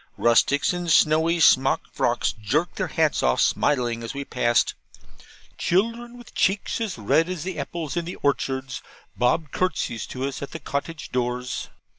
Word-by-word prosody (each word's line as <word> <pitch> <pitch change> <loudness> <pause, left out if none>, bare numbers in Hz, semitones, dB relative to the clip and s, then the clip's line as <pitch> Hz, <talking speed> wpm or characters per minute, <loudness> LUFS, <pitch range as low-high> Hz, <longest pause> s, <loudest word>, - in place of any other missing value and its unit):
Rustics 125 +7 +3
in 175 -1 -3
snowy 160 +2 +4
smock 135 -3 +5
frocks - - 0
jerked 125 - -1
their 185 - -1
hats 160 -2 +1
off 60 0 +2
smiling 120 -5 +1
as 115 +4 -6
we 140 0 -4
passed. 120 -3 +1 0.9
Children, 230 +6 0
with 240 - -14
cheeks 195 +4 0
as 215 - -3
red 155 - +2
as 180 -4 -4
the 185 0 -4
apples 165 -3 -4
in 170 -1 -1
the 175 - -6
orchards, 130 -2 -1 0.3
bobbed 130 +5 +1
curtsies 160 -11 -2
to 130 +1 -4
us 140 - -6
at 140 - -6
the 165 - -5
cottage 155 +3 -5
doors. 125 0 -2
150 Hz, 160 wpm, -24 LUFS, 125-175 Hz, 0.9 s, smock